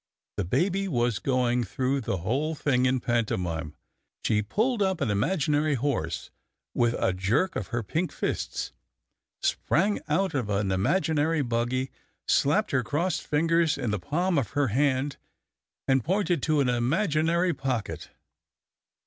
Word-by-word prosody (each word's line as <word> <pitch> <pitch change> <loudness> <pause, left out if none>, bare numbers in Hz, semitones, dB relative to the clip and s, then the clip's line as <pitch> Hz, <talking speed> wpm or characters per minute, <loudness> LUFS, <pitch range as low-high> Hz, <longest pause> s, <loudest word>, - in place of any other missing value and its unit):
The 100 - -1
baby 185 - +1
was 120 - 0
going 125 -2 +1
through 130 +5 -1
the 105 - -2
whole 135 - -1
thing 130 -4 +2
in 130 0 +2
pantomime. 90 -10 -1 0.5
She 105 -1 +2
pulled 220 - 0
up 190 -3 +1
an 135 -8 0
imaginary 150 - +1
horse 110 - -2 0.4
with 120 -1 +2
a 95 - +1
jerk 110 - +1
of 100 - -3
her 120 -1 -2
pink 165 - -1
fists, - - -3 0.7
sprang 200 +5 +1
out 185 +6 +1
of 125 -7 -1
an 100 -1 0
imaginary 155 - +1
buggy, 120 +2 -1 0.4
slapped 210 +10 +2
her 135 - +2
crossed 160 +8 -1
fingers 165 +1 +2
in 125 -6 -2
the 105 - -1
palm 170 - 0
of 125 - -4
her 140 -4 +3
hand, 135 +3 +1 0.7
and 135 -2 +3
pointed 180 -3 +1
to 155 0 +2
an 135 - +1
imaginary 165 - +1
pocket. 130 -5 -3
135 Hz, 140 wpm, -27 LUFS, 120-165 Hz, 0.7 s, her